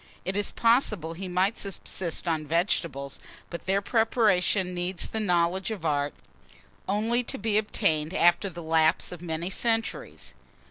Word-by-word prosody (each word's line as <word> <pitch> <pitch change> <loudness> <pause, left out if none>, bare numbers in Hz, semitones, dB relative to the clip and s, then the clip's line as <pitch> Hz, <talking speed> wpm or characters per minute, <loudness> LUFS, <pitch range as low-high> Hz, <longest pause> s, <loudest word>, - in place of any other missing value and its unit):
It 190 - -2
is 205 0 +1
possible 220 - +2
he 185 +3 -6
might 185 +4 +1
subsist 190 -4 -3
on 155 -2 -1
vegetables; 160 -4 -1 0.3
but 170 - -7
their 195 +1 +2
preparation 210 -5 +2
needs 180 +1 -1
the 220 - -3
knowledge 180 -1 +1
of 210 -7 -5
art, 145 -2 0 0.7
only 225 +4 +1
to - - -3
be 215 0 +2
obtained 160 -7 0
after 175 +1 +3
the 175 -1 -8
lapse 160 0 +3
of 175 -2 -8
many 170 +1 -3
centuries. 225 - -1
180 Hz, 145 wpm, -27 LUFS, 165-210 Hz, 0.7 s, after